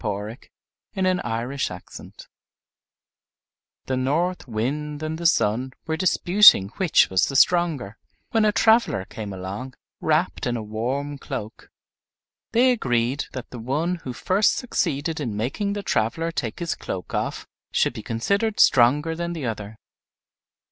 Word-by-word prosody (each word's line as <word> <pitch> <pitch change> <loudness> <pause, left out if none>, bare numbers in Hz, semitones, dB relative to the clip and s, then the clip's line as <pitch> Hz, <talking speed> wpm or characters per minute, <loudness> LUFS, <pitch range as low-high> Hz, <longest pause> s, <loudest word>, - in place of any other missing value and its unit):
Orthographic 105 +3 -5 0.5
version 135 - -3 1.7
The 130 - -1
North 155 +7 -1
Wind 145 +7 -3
and 155 +1 -3
the 170 - +3
Sun 125 -1 +1
were 160 0 -1
disputing 180 - +6
which 185 - +3
was 95 - +3
the 135 - -5
stronger, 150 - +2 0.3
when 225 -1 +3
a 210 - +4
traveler 220 - +3
came 105 0 -7
along 100 +7 -6 0.2
wrapped 160 0 0
in 120 -1 -1
a 110 - -5
warm 130 +7 -3
cloak. 110 -4 -7 0.8
They 250 +3 +4
agreed 125 - 0
that 130 -2 -7
the 125 - -7
one 150 +10 -1
who 135 -6 -7
first 190 - +2
succeeded 160 - -2
in 115 -8 -3
making 140 - -2
the 205 0 -4
traveler 165 - 0
take 120 -9 -3
his 170 -1 -2
cloak 90 -2 -6
off - - -2 0.3
should - - +1
be - - -7
considered 200 - -1
stronger 145 +6 +4
than 170 +1 -3
the 160 -5 -5
other. 110 -2 -5
140 Hz, 135 wpm, -23 LUFS, 115-170 Hz, 1.7 s, disputing